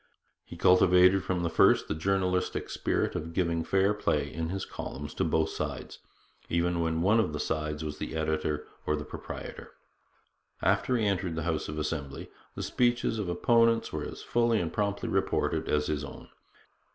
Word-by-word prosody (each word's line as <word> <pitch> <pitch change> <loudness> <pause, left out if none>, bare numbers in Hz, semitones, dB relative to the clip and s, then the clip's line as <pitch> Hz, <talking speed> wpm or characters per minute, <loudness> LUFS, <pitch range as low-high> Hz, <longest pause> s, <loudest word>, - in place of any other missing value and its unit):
He - - -11
cultivated 90 +1 +5
from 90 -2 -1
the 85 - 0
first - - +4
the - - -1
journalistic 90 +2 0
spirit - - 0
of 80 +1 -4
giving 85 -2 +1
fair 95 +4 +2
play 75 -8 -1
in 80 +1 -3
his 95 +2 -3
columns 75 +2 -7
to - - -1
both 80 0 +1
sides, - - -5 0.5
even 85 +1 +1
when 80 0 0
one 105 +5 +4
of 95 -9 0
the 75 - -3
sides 75 0 -2
was 75 0 -5
the - - -5
editor 80 -1 -1 0.2
or 75 - +2
the 75 -1 -5
proprietor. - - -8 0.9
After 125 - +2
he 110 - 0
entered 95 -4 0
the 80 - -2
House 80 -2 -2
of 75 - -5
Assembly, 75 -3 -4 0.2
the - - -4
speeches 120 -2 +1
of 100 -4 -2
opponents 115 +5 +3
were - - -2
as - - -7
fully 115 -2 +2
and 85 -2 -3
promptly 100 -1 -1
reported - - 0
as 75 0 +2
his 75 -1 -2
own. 70 - -9
85 Hz, 175 wpm, -29 LUFS, 75-95 Hz, 0.9 s, cultivated